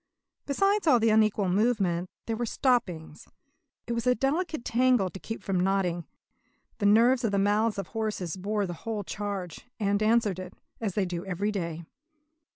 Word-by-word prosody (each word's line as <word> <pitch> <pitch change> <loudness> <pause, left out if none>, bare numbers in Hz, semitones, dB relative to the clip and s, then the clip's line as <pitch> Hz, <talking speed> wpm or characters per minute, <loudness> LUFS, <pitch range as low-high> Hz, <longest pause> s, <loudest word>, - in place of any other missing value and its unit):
Besides 390 +7 +1
all 250 -6 +6
the 225 0 +3
unequal 215 -2 +3
movement, 185 -3 +1 0.2
there 225 - -2
were 240 +2 -2
the - - -3
stoppings. 180 - -1 0.6
It 235 - -3
was 235 +1 -2
a 250 - +4
delicate 305 +3 -1
tangle 245 -6 +2
to 190 - -9
keep 225 - -7
from 195 -3 0
knotting. 180 -3 0 0.7
The 205 - +2
nerves 240 +5 +5
of 225 - +1
the 200 - +1
mouths 205 +2 +2
of 195 -3 -4
horses 210 -6 -3
bore 205 +2 -1
the 175 - -4
whole 220 -2 -3
charge 200 -2 -5
and 200 -1 +1
answered 215 -4 +2
it, 185 0 -8 0.2
as 210 -5 -3
they 200 - +1
do 175 -1 -4
every 195 +3 -1
day. 170 -4 -4
205 Hz, 175 wpm, -28 LUFS, 185-230 Hz, 0.7 s, all